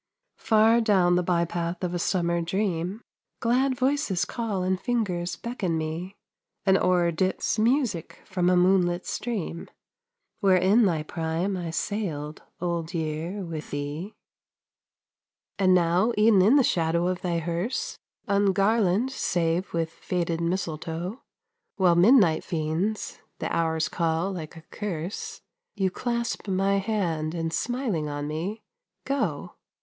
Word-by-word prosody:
Far 225 +2 +4
down 190 -5 +3
the 180 - +3
by 170 -1 +1
path 170 +1 -3
of 180 -1 -1
a 175 - -1
summer 170 -1 +1
dream, 185 +3 -2 0.4
Glad 255 +3 +2
voices 255 -8 +1
call 215 -6 -2
and 185 0 0
fingers 180 -8 -1
beckon 195 -7 -2
me 165 +5 -4 0.5
An 190 -1 +5
oar 180 -2 +3
dips 185 +5 0
music 225 - 0
from 180 -2 0
a 180 - +4
moonlit 180 -1 +3
stream, 195 -8 -4 0.7
Where 195 -3 +4
in 200 +5 +4
thy 160 -4 0
prime 165 +4 -2
I 175 -2 -4
sailed, 160 -5 -3 0.2
Old 170 -1 -2
Year, 165 +5 -3
with 160 -2 -6
thee 145 +8 -5 1.4
And 185 -1 +5
now, 180 +6 +3
e'en 210 -2 +5
in 215 +9 +5
the 280 - +6
shadow 170 -3 +1
of 180 0 -1
thy 175 -2 -1
hearse, 170 +8 -3 0.3
Ungarland 200 +3 +2
save 175 -6 0
with 165 -1 -1
fated 170 0 -2
mistletoe, 170 - -3 0.5
While 185 -3 +4
midnight 175 -2 +5
fiends 170 +6 -2 0.2
the - - -3
hours 160 -1 +1
call 165 +3 0
like 170 -3 -7
a 160 - -12
curse, 185 -3 -5 0.3
You 190 -3 0
clasp 235 +1 -2
my 195 +1 +2
hand 175 -7 -1
and 165 -1 -2
smiling 220 - -1
on 145 0 -4
me 180 +9 -4 0.4
go. 215 - -2
180 Hz, 135 wpm, -26 LUFS, 165-205 Hz, 1.4 s, the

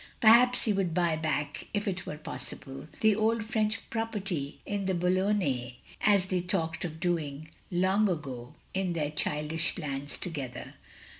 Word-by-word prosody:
Perhaps 240 +3 +8
he 215 - +3
would 185 -4 0
buy 170 -3 +2
back, 150 -2 -2
if 205 0 -1
it 185 -2 -2
were 150 - -5
possible, 135 -2 -7
the 220 -2 +5
old 220 +1 +1
French 220 0 -1
property 200 -10 -3
in 205 -1 -2
the 190 -1 +1
Botilonnais, 180 - +1 0.3
as 200 -3 +4
they 185 -1 -1
had 180 0 -4
talked 165 -4 -1
of 160 -2 -5
doing, 155 -4 -2 0.2
long 190 +3 +2
ago, 135 -8 -5 0.2
in 190 -2 0
their 150 -3 -1
childish 150 +2 0
plans 145 -3 -2
together. 140 -8 -5
175 Hz, 155 wpm, -29 LUFS, 150-205 Hz, 0.3 s, Perhaps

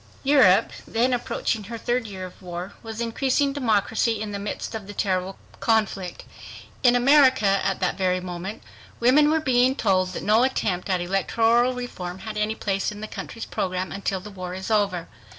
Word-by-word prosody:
Europe, 265 -10 +5 0.2
then 245 +3 +1
approaching 235 -3 -2
her 230 +3 -6
third 240 0 -1
year 190 -2 -6
of 185 - -13
war, 180 +1 -6
was 225 -1 -7
increasing 265 +4 +1
democracy 225 -3 +1
in 215 -1 -4
the 200 - -4
midst 205 +3 -5
of 215 -3 -6
the 205 - -9
terrible 190 -1 -1 0.2
conflict. 210 -5 0 0.6
In 245 -2 +5
America 255 -6 +5
at 195 -1 0
that 185 +1 -1
very 185 -1 +1
moment 180 +3 -6 0.4
women 275 +5 +5
were 320 +1 +3
being 260 -3 +3
told 185 -6 +1
that - - -5
no 215 +2 +4
attempt 210 -8 0
at 185 -2 +1
electoral 225 +7 +2
reform 185 -8 -6
had 220 -1 -5
any 210 +1 -1
place 195 -1 -1
in 210 0 -9
the 215 - -5
country's 230 +1 -7
program 185 0 -3
"until 195 -1 -2
the 210 +3 -10
war 185 -2 -6
is 190 +4 -5
over." 200 -5 +1
210 Hz, 180 wpm, -24 LUFS, 190-240 Hz, 0.6 s, Europe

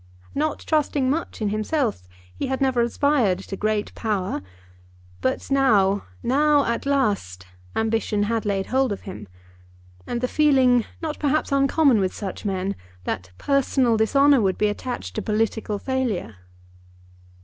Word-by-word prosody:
Not 305 +1 0
trusting 290 -4 +1
much 300 -7 -3
in 210 - +1
himself, 215 - -1 0.3
he - - -3
had 265 0 -2
never 260 -3 +2
aspired 235 -5 +2
to 195 +1 -7
great 210 +1 -1
power. 205 - -2 0.8
But 130 - -2
now, 205 -8 +3 0.2
now 290 +3 +3
at 235 +3 -2
last, 200 - 0 0.3
ambition 220 -2 0
had 225 +1 -1
laid 195 -2 -1
hold 260 0 +1
of 200 - -4
him, 190 - -9 0.8
and 240 - -2
the 250 - 0
feeling, 260 -5 +4 0.2
not 310 -1 -3
perhaps 300 +1 0
uncommon 275 -2 +4
with 190 -2 -1
such 200 +1 -6
men, 195 0 -1 0.3
that 90 +1 -4
personal 265 -3 +2
dishonour 275 +5 +4
would 190 -2 +1
be 210 - +2
attached 205 - -5
to - - 0
political 215 -1 -1
failure. 230 - -2
230 Hz, 140 wpm, -23 LUFS, 205-275 Hz, 0.8 s, feeling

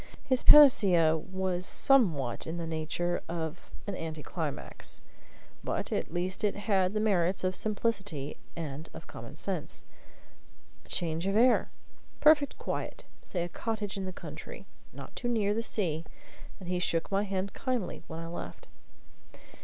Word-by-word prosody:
His 260 -3 +2
panacea 190 - +7
was 185 +2 -2
somewhat 170 - +4
in 165 +2 -4
the 170 - -3
nature 165 +2 -2
of 165 0 -5 0.2
an 205 - -4
anti 160 -4 -5
climax, 160 -5 -4 0.6
but - - -2
at - - -2
least 180 +4 -1
it 210 - +1
had 200 -2 +1
the - - +2
merits 190 -4 +1
of 185 0 0
simplicity 205 -9 -1 0.2
and 155 -1 -6
of - - -9
common - - -10
sense. - - -3 1.0
A - - -21
change 165 +1 -1
of 195 - 0
air 245 +3 +4 0.5
perfect 300 -2 +5
quiet - - -4 0.2
say 175 -2 -2
a - - -3
cottage 210 +2 -3
in 195 -1 -3
the 185 - -4
country - - -9 0.3
not - - -11
too 240 - -3
near 215 -4 +1
the 225 - -1
sea. 170 -8 0 0.6
And 185 - -9
he 180 0 0
shook 170 0 0
my 195 0 +2
hand 195 -1 -2
kindly 250 -8 -2
when 160 - -6
I - - -6
left. 165 - -7
185 Hz, 155 wpm, -30 LUFS, 165-210 Hz, 1.0 s, panacea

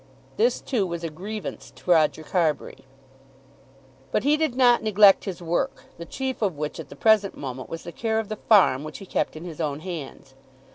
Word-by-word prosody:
This, 235 +3 +2
too, 220 -8 -1
was 170 -1 -5
a 165 - -3
grievance 205 +7 -7
to 180 - -3
Roger 155 -1 +3
Carbury. 160 -5 -1 1.3
But - - +1
he 290 +2 +4
did 305 -5 -1
not 245 -2 +5
neglect 205 -2 +5
his 185 -3 -6
work, 170 +1 -1 0.2
the 170 - -7
chief 265 -2 -4
of 190 -8 0
which 150 +2 -4
at 155 - -8
the - - -10
present 210 +3 +3
moment 130 -2 -6
was 165 0 -6
the 170 - -7
care 220 +4 -1
of 220 -1 -1
the 215 - -5
farm 185 - +5
which 155 0 -7
he 195 - -10
kept - - -2
in 160 +3 -8
his 165 -2 -7
own 150 -1 -2
hands. 155 -6 -8
180 Hz, 200 wpm, -25 LUFS, 155-220 Hz, 1.3 s, not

